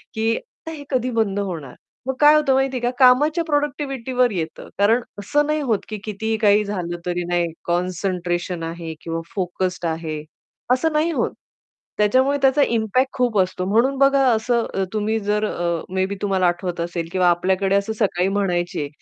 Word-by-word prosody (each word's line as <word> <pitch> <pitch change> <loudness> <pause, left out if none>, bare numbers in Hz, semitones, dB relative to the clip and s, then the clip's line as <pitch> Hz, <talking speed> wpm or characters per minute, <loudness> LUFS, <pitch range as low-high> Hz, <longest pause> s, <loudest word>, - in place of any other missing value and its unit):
की 225 +1 +1
आता 325 -8 -11
हे 295 -3 -8
कधी 255 -2 0
बंद 210 -3 0
होणार, 165 -10 -5 0.3
मग 265 - 0
काय 300 +1 +7
होतं 295 -3 +3
माहितीये 265 -2 +1
का? 245 - +1
कामाच्या 295 +6 +5
प्रॉडक्टिव्हिटीवर 270 -5 0
येतं. 165 -4 -5
कारण 225 +4 +4 0.2
असं 290 +8 +1
नाही 305 0 +1
होत, 225 -7 +1
की 215 - -4
कितीही 220 +1 -2
काही 210 -1 +4
झालं 175 -4 -3
तरी 175 0 -1
नाही 175 -1 0 0.2
कॉन्सन्ट्रेशन 175 -1 -2
आहे 165 0 -5
किंवा 165 0 -4
फोकस्ड 180 -1 -2
आहे 160 -2 -3 0.5
असं 315 +5 +1
नाही 315 +3 +2
होत. - - 0 0.7
त्याच्यामुळे 260 +7 +3
त्याचा 270 +2 +4
इम्पॅक्ट 235 +3 +1
खूप 245 -4 +1
असतो, 185 0 0
म्हणून 240 +7 +2
बघा 275 0 +4
असं 235 +1 +1 0.3
तुम्ही 215 +1 0
जर 210 +1 0
अ, 170 -4 -2
मे 190 0 +1
बी 200 +1 -4
तुम्हाला 190 -3 +2
आठवत 175 0 -2
असेल 170 -1 -3
किंवा 185 -1 +2
आपल्याकडे 190 +3 +1
असं 200 +2 0
सकाळी 190 -4 0
म्हणायचे 175 -6 -1
205 Hz, 165 wpm, -21 LUFS, 180-255 Hz, 0.7 s, काय